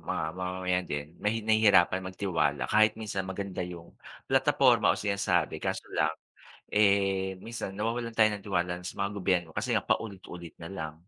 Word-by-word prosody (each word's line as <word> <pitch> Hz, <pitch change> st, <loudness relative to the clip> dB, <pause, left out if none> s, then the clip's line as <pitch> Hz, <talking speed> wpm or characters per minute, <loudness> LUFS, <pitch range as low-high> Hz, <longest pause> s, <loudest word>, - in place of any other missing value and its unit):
mga -, -, -3 dB
mamamayan 90 Hz, 0 st, -2 dB
din 75 Hz, +2 st, -4 dB
nahi 110 Hz, +1 st, -1 dB
nahihirapan 105 Hz, -4 st, +4 dB
magtiwala 90 Hz, -6 st, -1 dB
kahit 110 Hz, 0 st, +4 dB
minsan 100 Hz, -4 st, -4 dB
maganda 95 Hz, -1 st, -4 dB
'yong 90 Hz, -1 st, -7 dB, 0.3 s
plataporma 130 Hz, -4 st, +4 dB
o -, -, -7 dB
sinasabi 100 Hz, -1 st, 0 dB
kaso -, -, -2 dB
lang, 80 Hz, +1 st, +1 dB, 0.5 s
eh, 95 Hz, -2 st, +2 dB
minsan 115 Hz, -4 st, -5 dB
nawawalan 115 Hz, +3 st, -2 dB
tayo 110 Hz, -1 st, +5 dB
ng 100 Hz, -, -14 dB
tiwala 90 Hz, -3 st, -1 dB
na 90 Hz, -, -11 dB
sa -, -, -7 dB
mga 100 Hz, +1 st, 0 dB
gobyerno 90 Hz, -3 st, +1 dB
kasi -, -, -1 dB
nga -, -, +1 dB
paulit-ulit 90 Hz, -5 st, -3 dB
na 80 Hz, -, -7 dB
lang, 80 Hz, -5 st, -5 dB
95 Hz, 165 wpm, -29 LUFS, 90-110 Hz, 0.5 s, tayo